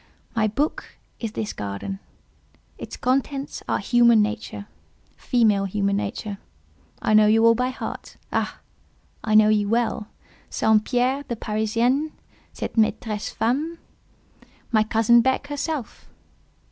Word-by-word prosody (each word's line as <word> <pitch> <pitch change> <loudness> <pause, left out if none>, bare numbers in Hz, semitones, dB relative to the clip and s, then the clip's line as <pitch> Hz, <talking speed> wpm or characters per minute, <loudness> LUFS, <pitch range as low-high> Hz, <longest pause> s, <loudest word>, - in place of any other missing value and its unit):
My 220 -1 +2
book 285 +9 -3 0.2
is 225 -2 -4
this 215 -2 -3
garden; 105 - -5 0.8
its - - -7
contents 275 +2 -1
are - - +2
human 235 -2 +4
nature—female 215 0 -2
human 200 0 0
nature. 200 0 -4 0.6
I 215 - 0
know 215 0 +6
you 225 +1 +4
all 230 - +7
by 250 +2 0
heart. 260 - -7 0.2
Ah! - - -2 0.6
I 215 -2 +1
know 215 0 +7
you 210 -1 +2
well—St. 220 -1 -1
Pierre, 255 +2 +1
the 235 - -2
Parisienne—cette 230 +8 -2
maîtresse 215 -1 0
femme, 290 +9 -1 0.9
my 220 -2 +4
cousin 225 +2 +4
Beck 260 +3 +1
herself." 290 -2 -5
225 Hz, 115 wpm, -23 LUFS, 210-250 Hz, 0.9 s, all